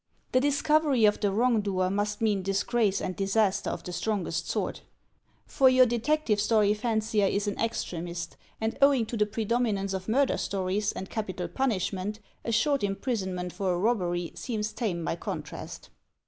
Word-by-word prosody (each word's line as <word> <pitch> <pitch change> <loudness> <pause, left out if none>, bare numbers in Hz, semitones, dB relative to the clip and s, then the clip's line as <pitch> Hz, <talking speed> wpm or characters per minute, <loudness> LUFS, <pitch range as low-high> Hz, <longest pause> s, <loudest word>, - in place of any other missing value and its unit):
The 255 - +4
discovery 285 -2 +3
of 210 - +3
the 205 - +1
wrong 230 +2 +2
doer 185 -2 0
must 205 +1 -1
mean 210 -3 +2
disgrace 195 +2 +1
and 185 - -3
disaster 195 +1 +1
of - - -5
the 180 - -6
strongest 175 -5 -2
sort. - - -2 0.6
For 265 -2 +4
your 255 0 +6
detective 240 -1 +1
story 215 -1 +3
fancier 220 -2 +1
is 200 +2 0
an 205 - -3
extremist; 175 -6 -3 0.2
and, 220 +4 -2
owing 275 -4 +5
to 230 - -5
the 210 -1 +2
predominance 215 -2 0
of 190 +2 -4
murder 270 +4 +2
stories 195 +1 -1
and 190 - -6
capital 185 -5 -4
punishment, 205 -1 -1 0.2
a 230 - -2
short 280 +4 +2
imprisonment 190 -4 -2
for 185 -3 0
a - - -1
robbery 175 -5 0
seems 215 -4 -3
tame 175 -8 -2
by - - -1
contrast. - - -7
210 Hz, 160 wpm, -28 LUFS, 190-235 Hz, 0.6 s, your